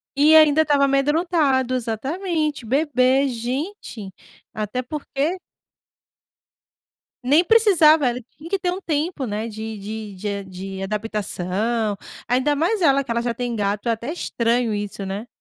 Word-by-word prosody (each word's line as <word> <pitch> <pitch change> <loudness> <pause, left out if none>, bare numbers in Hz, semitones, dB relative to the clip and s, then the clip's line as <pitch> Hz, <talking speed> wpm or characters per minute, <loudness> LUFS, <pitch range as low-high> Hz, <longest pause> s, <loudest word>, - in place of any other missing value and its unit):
E 300 +3 +6
ainda 310 0 +6
estava 290 -2 +2
amedrontado, 275 -2 +1
exatamente, 295 - -2
bebê, 270 0 +2
gente. 245 - -5 0.4
Até 215 +3 -3
porque 300 +5 -3 1.8
Nem 290 +7 +4
precisava, 330 - +5
ele 240 -1 -5
tinha 320 +3 -11
que 395 - +1
ter 360 -1 -1
um 370 +2 -5
tempo, 310 -3 -2
né, 215 +1 -3
de 220 0 -6
de 210 0 -7
de 190 +3 -6
a - - -7
de 190 +1 -7
adaptação, 210 +1 -2 0.3
ainda 260 +5 +2
mais 355 +8 0
ela, 275 -4 +4
que 250 - -6
ela 235 0 0
já 240 0 -1
tem 240 0 -3
gato, 205 +1 -2
é - - +3
até 235 +5 -3
estranho 235 -7 0
isso, 205 -1 -4
né. 200 +5 -5
255 Hz, 145 wpm, -22 LUFS, 220-305 Hz, 1.8 s, E